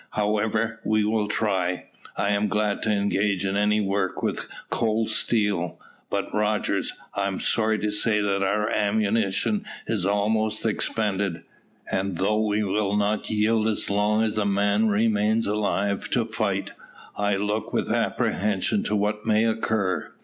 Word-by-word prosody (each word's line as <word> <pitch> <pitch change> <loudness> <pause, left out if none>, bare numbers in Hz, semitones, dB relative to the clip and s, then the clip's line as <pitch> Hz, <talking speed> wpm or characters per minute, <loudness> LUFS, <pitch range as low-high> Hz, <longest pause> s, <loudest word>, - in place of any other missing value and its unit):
"However, 110 +2 0
we 110 0 +2
will 105 -1 +1
try. 95 -4 -1 0.3
I 100 - +1
am 105 +1 +2
glad 105 0 0
to - - -1
engage 100 -1 +1
in 95 0 -1
any 105 +1 +3
work 100 -2 -1
with - - -2 0.2
cold 110 -1 +1
steel; 105 -6 0 0.3
but, - - -2
Rogers, 105 0 0 0.2
I 100 0 0
am 95 -1 -3
sorry 110 -1 +1
to 105 0 -1
say 105 +1 +1
that 100 -1 0
our 105 +2 +1
ammunition 105 - +1 0.2
is 105 -5 -1
almost 110 +2 +1
expended, 100 -5 -1 0.5
and 95 -2 -1
though 105 +4 +1
we 105 +1 +1
will 100 0 0
not 105 +1 0
yield 110 +1 +2
as 110 -2 -1
long 105 +2 +2
as 110 -1 0
a - - +2
man 100 +2 +2
remains 110 +1 +2
alive 100 -1 -1
to 120 -3 +1
fight, 100 -3 -2 0.4
I 105 -1 +1
look 105 +2 -2
with - - -1
apprehension 105 - 0
to 105 - 0
what 105 +1 -1
may 110 0 +3
occur." 110 -4 0
105 Hz, 150 wpm, -25 LUFS, 100-110 Hz, 0.5 s, any